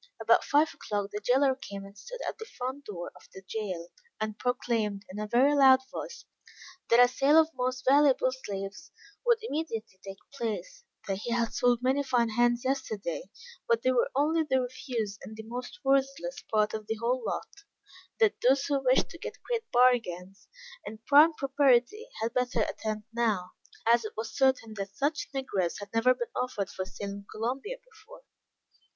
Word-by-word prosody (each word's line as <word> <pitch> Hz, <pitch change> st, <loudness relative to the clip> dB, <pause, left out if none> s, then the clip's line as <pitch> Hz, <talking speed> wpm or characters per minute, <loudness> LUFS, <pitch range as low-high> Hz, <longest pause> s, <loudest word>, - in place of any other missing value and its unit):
About -, -, +4 dB
five 300 Hz, +1 st, +3 dB
o'clock, 205 Hz, -1 st, -3 dB
the 210 Hz, -, -3 dB
jailer 265 Hz, +5 st, +3 dB
came 200 Hz, -6 st, -8 dB
and 200 Hz, 0 st, -13 dB
stood -, -, -9 dB
at -, -, -4 dB
the 445 Hz, -, -6 dB
front 260 Hz, +3 st, -4 dB
door 175 Hz, -4 st, -6 dB
of -, -, -18 dB
the 190 Hz, -, -10 dB
jail, 185 Hz, -6 st, -4 dB, 0.3 s
and 215 Hz, -1 st, -3 dB
proclaimed, 225 Hz, -5 st, -1 dB
in 200 Hz, -, -7 dB
a 210 Hz, -, -3 dB
very 250 Hz, +6 st, +4 dB
loud 265 Hz, -2 st, +7 dB
voice, 475 Hz, -1 st, -7 dB, 0.6 s
that 235 Hz, -, +6 dB
a 245 Hz, -, +8 dB
sale 275 Hz, +4 st, +3 dB
of 320 Hz, 0 st, +5 dB
most 255 Hz, 0 st, -2 dB
valuable 270 Hz, -2 st, +5 dB
slaves 200 Hz, -6 st, -6 dB, 0.3 s
would 475 Hz, -2 st, +4 dB
immediately 280 Hz, -, -4 dB
take 195 Hz, 0 st, -8 dB, 0.2 s
place; 280 Hz, -, -4 dB, 0.2 s
that 195 Hz, -1 st, -1 dB
he 235 Hz, +4 st, -5 dB
had 235 Hz, -1 st, 0 dB
sold 245 Hz, 0 st, +2 dB
many 265 Hz, +2 st, +2 dB
fine 245 Hz, -4 st, +1 dB
hands 240 Hz, +2 st, +2 dB
yesterday, 220 Hz, -10 st, -3 dB, 0.4 s
but 235 Hz, 0 st, +2 dB
they 255 Hz, -, +3 dB
were 250 Hz, -2 st, +2 dB
only 310 Hz, +4 st, +2 dB
the 280 Hz, -4 st, +1 dB
refuse 240 Hz, -5 st, -4 dB
and 215 Hz, -, -9 dB
most 245 Hz, +7 st, -6 dB
worthless 275 Hz, -, 0 dB
part 215 Hz, -1 st, +2 dB
of 215 Hz, -1 st, -5 dB
the 220 Hz, -, -1 dB
whole 240 Hz, +3 st, -1 dB
lot; 400 Hz, -, -5 dB, 0.6 s
that 440 Hz, -3 st, +5 dB
those 270 Hz, +3 st, +4 dB
who 280 Hz, -2 st, 0 dB
wished 255 Hz, 0 st, +3 dB
to 335 Hz, -, -11 dB
get -, -, -7 dB
great 465 Hz, -2 st, -3 dB
bargains 205 Hz, -7 st, +2 dB, 0.4 s
and 220 Hz, +1 st, -9 dB
prime 295 Hz, +3 st, +7 dB
property, 275 Hz, -, +2 dB
had 230 Hz, +1 st, -1 dB
better 250 Hz, -2 st, 0 dB
attend 215 Hz, 0 st, -4 dB
now; 215 Hz, -6 st, 0 dB, 0.4 s
as 235 Hz, 0 st, +5 dB
it 215 Hz, -, -6 dB
was 220 Hz, 0 st, -5 dB
certain 260 Hz, -5 st, +2 dB
that 200 Hz, -1 st, -6 dB
such 290 Hz, +2 st, -1 dB
negroes 205 Hz, -11 st, -2 dB
had 205 Hz, 0 st, -9 dB
never 245 Hz, +3 st, +4 dB
been 240 Hz, -1 st, -5 dB
offered 210 Hz, -6 st, -2 dB
for 190 Hz, -, -4 dB
sale 195 Hz, +2 st, -7 dB
in 200 Hz, 0 st, -8 dB
Columbia 265 Hz, -, -3 dB
before. 465 Hz, +1 st, -16 dB
245 Hz, 180 wpm, -29 LUFS, 215-275 Hz, 0.6 s, a